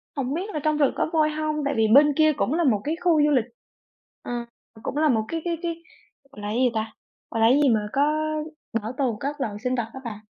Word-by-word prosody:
hổng 270 0 -2
biết 375 +6 -3
là 305 - -1
trong 305 -1 +1
rừng 285 -3 +3
có - - 0
voi 310 -1 +3
hông, 305 0 -2
tại 285 - 0
vì 220 -1 +3
bên 285 +6 +6
kia 310 +1 +4
cũng 275 - -1
là 340 +1 +1
một 215 -8 +2
cái 310 +3 -1
khu 325 -4 +4
du 300 - +4
lịch, 250 -5 +3 0.8
ờ, - - -7 0.5
cũng 290 - -4
là 310 -1 +3
một 220 -3 +1
cái 330 -1 -3
cái 340 -1 -1
cái, 335 -1 -4 0.5
gọi 210 - -11
là, 205 - -4
cái 215 - -2
gì 250 -1 +3
ta 220 0 -2 0.4
gọi 225 - -1
là 225 - +6
cái 265 +4 +5
gì 275 - +5
mà 210 -2 +1
có 275 - +2 0.8
bảo 220 +3 -5
tồn 255 -6 0
các 285 +1 -4
loại 210 -5 -2
sinh 255 0 0
vật 235 -2 -2
á 265 - -7
bạn, 215 -3 -6
275 Hz, 260 wpm, -24 LUFS, 225-310 Hz, 0.8 s, bên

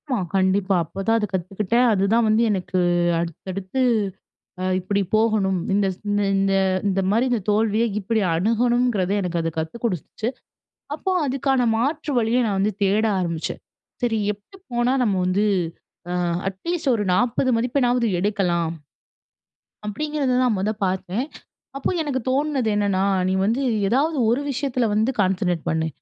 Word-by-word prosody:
ஆமா, 255 - +1 0.2
கண்டிப்பா. 190 +1 +2
அப்போ 165 +4 -9
தான் 225 0 +4
அது 210 - -1
கத்துக்கிட்டேன். 195 +6 +1
அதுதான் 210 +4 +2
வந்து 215 +1 +3
எனக்கு 185 -2 -1 0.4
அடுத்தடுத்து 185 - -4 0.8
அ - - -1
இப்பிடி 200 +2 -1
போகணும். 215 -3 +2 0.2
இந்தஸ் 195 -2 +1
இந்த, 205 0 +1
இந்த, 195 0 +2 0.4
இந்தமாரி 195 +4 +1
இந்த 240 - +2
தோல்விய 215 +1 +2 0.2
இப்பிடி 220 +3 0
அணுகணுங்கிறதே 225 +1 +1
எனக்கு 175 -2 -1
அது 165 0 -1
கத்து 160 +5 -3
குடுத்துச்சு. 215 +2 -2 0.7
அப்போ 380 - -3
அதுக்கான 270 -2 +1
மாற்று 290 +5 -1
வழிய 230 +1 +2
நான் 200 -2 0
வந்து 205 +2 +1
தேட 200 +3 +3
ஆரம்பிச்சேன். 170 -3 -3 0.4
சரி, 230 -2 +1
எப்பிடி 210 - -16
போனா 240 +1 +1
நம்ம 210 -5 +1
வந்து, 190 +3 +1 0.7
அ - - -1 0.3
அட்லீஸ்ட் 300 - -2
ஒரு 210 -2 -1
40 245 +5 +2
மதிப்பெண்ணாவது 245 0 +1
எடுக்கலாம். 180 -5 0 1.2
அப்பிடிங்கிறத 280 +2 -1
தான் 245 -4 +2
மொத 205 +3 0
பார்த்தேன். 190 +5 -2 0.5
அப்போ 275 - -1
எனக்கு 270 -4 -2
தோணுனது 270 -3 0
என்னன்னா, 200 -2 +1 0.3
நீ - - +1
வந்து 230 +6 +1 0.3
ஏதாவது 290 +7 +1
ஒரு 245 +5 +1
விஷயத்தில 255 -3 -1
வந்து 220 +5 +2
கான்சன்ட்ரேட் 185 -3 0
பண்ணு. 160 0 0
215 Hz, 140 wpm, -22 LUFS, 190-245 Hz, 1.2 s, தான்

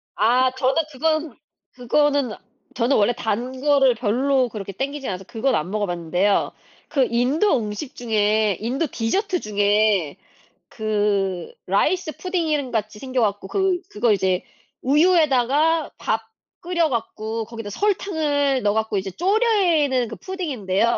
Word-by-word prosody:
아 255 +2 +3
저는 260 +4 +2
그건 310 0 -1 0.4
그거는 275 -1 +1 0.4
저는 245 +3 +2
원래 215 +3 +3
단 240 +4 -3
거를 275 -4 +4
별로 255 +3 +1
그렇게 200 -3 -6
땡기지 275 +6 -4
않아서 190 0 -4
그건 245 +2 0
안 165 +4 -2
먹어 210 -1 0
봤는데요. 175 +3 0 0.4
그 275 -5 +2
인도 260 - +2
음식 215 +5 -5
중에 215 -3 +1
인도 260 +8 -1
디저트 360 - -1
중에 205 -5 +1 0.5
그 205 - -1
라이스 360 -4 0
푸딩인 315 -8 -1
같이 215 -1 -3
생겨 260 -2 -2
갖고 205 -2 -1
그 380 - 0
그거 220 +2 +1
이제 185 -2 0 0.4
우유에다가 305 0 +3
밥 225 +1 -1 0.4
끓여 340 -2 +1
갖고 225 -2 -3
거기다 225 -2 -7
설탕을 295 - 0
넣어 205 0 +2
갖고 220 -2 -1
이제 190 0 -3
조리는 350 - +2
그 225 - -7
푸딩인데요. 235 - -1
245 Hz, 280 characters per minute, -22 LUFS, 210-295 Hz, 0.5 s, 거를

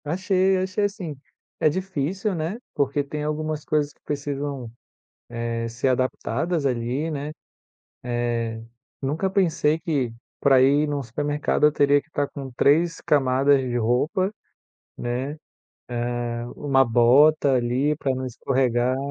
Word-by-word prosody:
Achei, 185 +4 +1
achei 185 +2 0
assim, 190 -7 -4 0.4
é - - +4
difícil, 190 +3 -2
né, 165 +5 -3 0.2
porque 140 +1 0
tem 150 +1 -5
algumas 155 0 -2
coisas 150 -1 0
que - - -38
precisam, 140 -4 -4 0.7
eh, 115 0 -2
ser 120 +3 -1
adaptadas 140 +5 -1
ali, 130 +5 -1
né, 145 0 -4 1.0
eh, 115 -1 -3 0.4
nunca 150 +8 0
pensei 165 -5 +2
que, 145 -7 -1 0.3
para 135 -2 +5
ir 145 +3 +4
num 145 -1 -2
supermercado, 145 +4 0
eu 150 - +4
teria 145 0 +4
que 160 - -27
estar 145 -2 -1
com 135 -2 -7
3 165 +4 +3
camadas 140 0 +3
de 125 -2 -2
roupa, 145 - +1 0.7
né? 125 +4 -3 1.0
Eh, 120 0 -4
uma 135 -2 +3
bota 135 +5 +5
ali 130 +5 +1
pra 135 -3 -1
não 130 0 -4
escorregar. 125 0 0
145 Hz, 130 wpm, -24 LUFS, 130-155 Hz, 1.0 s, para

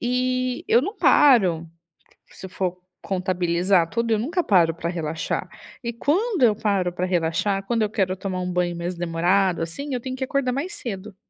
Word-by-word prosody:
E 255 +1 -1
eu 240 - +5
não 400 +9 -4
paro. 190 - +4 0.6
Se 190 - -10
for 180 -1 -3 0.2
contabilizar 180 -1 +1
tudo, 230 0 -1
eu 220 - +3
nunca 340 - -1
paro 170 - +4
pra 170 0 -3
relaxar. 165 -2 -3 0.4
E 235 0 -3
quando 355 - 0
eu 220 -3 +5
paro 200 -4 0
pra 180 +1 -2
relaxar, 185 +3 0
quando 230 +1 0
eu 210 - 0
quero 190 -3 -1
tomar 185 -1 -3
um 180 0 -3
banho 175 -1 0
mais 175 +1 -4
demorado, 175 +2 +1
assim, 265 - -5
eu 250 - -1
tenho 260 +1 -5
que 265 - -4
acordar 265 -1 0
mais 290 +10 -3
cedo. 210 -3 -6
195 Hz, 180 wpm, -23 LUFS, 175-250 Hz, 0.6 s, eu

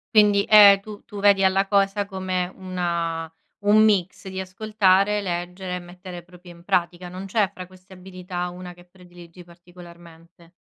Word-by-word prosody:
Quindi, 205 -1 +4
ehm, 205 -2 +8
tu 205 +1 -12
tu 205 -2 -9
vedi 200 -1 +4
alla 190 +1 +2
cosa 200 0 +1
come 185 -2 -3
una 170 -3 -4 0.3
un 215 +1 +5
mix 195 -3 0
di 190 0 -6
ascoltare, 200 +1 +1
leggere 180 0 -5
e - - -4
mettere 180 0 -11
proprio 180 0 -16
in 170 0 -16
pratica. 175 -1 -1
Non 185 +2 -8
c'è 195 0 0
fra 185 - -9
queste 185 +1 -18
abilità 180 -1 -7
una 180 0 -10
che 175 0 -19
prediligi 175 -1 -16
particolarmente? 170 -1 -17
185 Hz, 160 wpm, -23 LUFS, 175-195 Hz, 0.3 s, ehm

